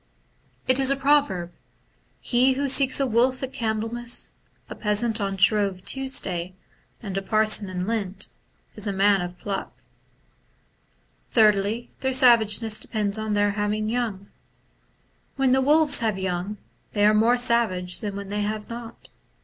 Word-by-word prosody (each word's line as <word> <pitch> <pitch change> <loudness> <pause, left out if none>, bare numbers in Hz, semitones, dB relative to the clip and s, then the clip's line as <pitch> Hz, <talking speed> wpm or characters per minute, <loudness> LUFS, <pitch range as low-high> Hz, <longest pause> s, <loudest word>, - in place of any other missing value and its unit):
It 255 +1 +5
is 265 -1 +3
a 275 - +2
proverb, 270 -11 +1 0.4
* - - -41 0.3
He 255 +2 +2
who 280 +2 -2
seeks 270 0 +4
a 275 - +2
wolf 255 +2 +1
at 265 - -5
Candlemas, 225 +2 -2 0.4
a - - -7
peasant 215 +1 0
on 195 -1 -2
Shrove 195 -1 +1
Tuesday, 185 -10 -2 0.5
and 195 -3 -6
a - - -8
parson 215 0 +1
in 180 -1 -4
Lent, 200 -3 -3 0.5
is 210 0 -3
a 200 - -1
man 195 0 +3
of 175 0 -6
pluck.'... 200 -2 -6 1.5
Thirdly, 215 +1 +2
their 265 0 -1
savageness 225 -4 +4
depends 210 -1 -2
on 220 -1 -3
their 205 0 +2
having 210 +1 -2
young. 220 -5 -3 0.5
« - - -41
When 270 -1 +1
the 265 +1 +3
wolves 295 +1 +5
have 220 -4 -1
young, 190 +2 -4 0.4
they 205 -1 +2
are 210 - +5
more 225 +3 +3
savage 220 -7 +1
than 205 -2 -5
when 200 -1 -7
they 205 +1 -2
have 210 0 -4
not. 235 0 -9
215 Hz, 155 wpm, -24 LUFS, 200-245 Hz, 1.5 s, It